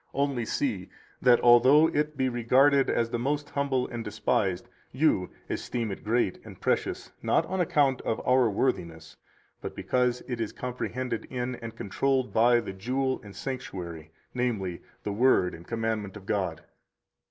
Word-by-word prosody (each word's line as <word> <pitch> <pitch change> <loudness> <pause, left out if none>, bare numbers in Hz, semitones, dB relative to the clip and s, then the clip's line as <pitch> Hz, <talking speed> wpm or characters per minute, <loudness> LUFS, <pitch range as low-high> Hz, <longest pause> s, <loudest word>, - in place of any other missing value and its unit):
Only 140 -4 0
see 110 -8 -2 0.3
that, 125 -1 +6
although 130 +6 +7
it 150 -2 -1
be 130 -1 +1
regarded 130 +3 +3
as 115 0 0
the 120 - -1
most 145 +4 -2
humble 140 -3 0
and 120 -1 -5
despised, 100 -3 -1 0.2
you 130 - +2 0.2
esteem 115 -3 -3
it 95 - -7
great 110 -3 0
and - - -12
precious, - - -1
not - - +2
on 190 0 -1
account 140 -6 +2
of 110 - -2
our 125 -2 +4
worthiness, 85 -8 -2 0.5
but - - -6
because 125 -1 0
it 120 -3 -3
is 110 - -3
comprehended 125 -1 -4
in, 125 0 -3
and 115 0 -8
controlled 130 +5 0
by, 120 +2 +5
the 95 - -6
jewel 130 +7 -1
and 100 -2 -12
sanctuary, 90 - -6 0.2
namely, 110 -8 -2 0.2
the 105 - -2
Word 105 -5 +3
and 85 +1 -11
commandment 110 -3 -2
of 100 - -13
God. 95 -6 -2
120 Hz, 155 wpm, -28 LUFS, 105-130 Hz, 0.5 s, although